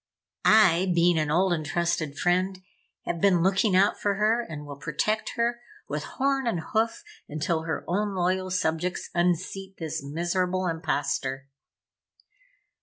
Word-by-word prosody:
I, 190 -4 +5
being 170 -1 +4
an 155 -1 0
old 180 +4 +3
and 160 -2 -2
trusted 160 -2 -1
friend, 185 +3 +1 0.5
have 170 -1 -3
been 180 -4 +4
looking 190 +1 +2
out 195 +2 +3
for 205 -1 +1
her 215 +4 +2
and 155 -9 -8
will 145 -1 -8
protect 190 +9 -1
her 235 0 0 0.3
with - - -3
horn 270 -1 +1
and 180 -8 0
hoof 225 +1 +1 0.3
until 160 +2 -1
her 160 - -3
own 200 +3 -1
loyal 185 +1 0
subjects 180 -1 -1
unseat 185 +2 -1
this 160 -3 -4
miserable 180 +5 -1
imposter!" 140 -5 -2
180 Hz, 140 wpm, -26 LUFS, 160-195 Hz, 0.5 s, I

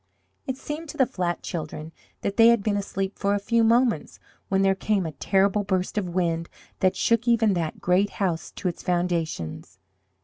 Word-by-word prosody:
It 260 -1 -2
seemed 300 +3 -6
to 305 - -8
the 265 - +5
flat 175 -6 -3
children 155 -1 -5 0.3
that 200 - -2
they 225 0 +7
had 235 -3 +4
been 210 -1 +1
asleep 195 -1 -3
but 200 0 +2
a - - +2
few 230 +3 +1
moments 235 +1 +2 0.3
when 195 0 +2
there 195 0 +4
came 195 0 0
a 160 - -3
terrible 195 +7 +1
burst 190 0 -1
of 200 -4 -1
wind 170 -2 -1 0.3
that 185 -1 +2
shook 230 +1 +1
even 225 -3 +4
that 165 -3 -3
great 185 +3 +2
house 175 -5 -1
to - - -4
its 175 - -3
foundations. 165 - -2
195 Hz, 190 wpm, -25 LUFS, 175-220 Hz, 0.3 s, they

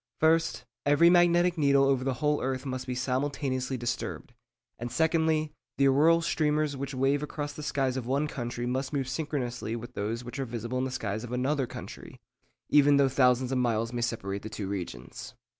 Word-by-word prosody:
First, 160 -5 +2 0.2
every 145 +4 +5
magnetic 175 0 +4
needle 140 -2 +4
over 135 -2 +2
the 135 -1 -1
whole 150 +2 0
earth 130 +1 -2
must 130 -1 -4
be 125 - -2
simultaneously 130 0 -1
disturbed; 120 0 -4 0.5
and 120 +1 -5
secondly, 160 +2 +1 0.2
the 140 - +4
auroral 165 +5 +4
streamers 150 -2 +1
which 140 0 -5
wave 135 +2 +2
across 145 -1 -4
the 150 - -8
skies 135 -3 -1
of 125 -2 -4
one 140 +4 +1
country 120 -3 -4
must 130 +3 -2
move 135 -3 -1
synchronously 125 -6 -3
with 120 +2 -8
those 115 +3 -3
which 125 +3 -7
are 135 - -1
visible 120 +1 -4
in 130 - 0
the - - -2
skies 110 -3 -3
of 120 - -7
another 130 +2 0
country, - - -9 0.5
even 145 -1 +5
though 140 -1 +4
thousands 125 -1 +3
of 130 - +1
miles 115 -1 0
may 120 - -2
separate 105 -4 -2
the 110 - -7
two 105 -2 -5
regions. 90 -11 -6
130 Hz, 190 wpm, -28 LUFS, 120-145 Hz, 0.5 s, every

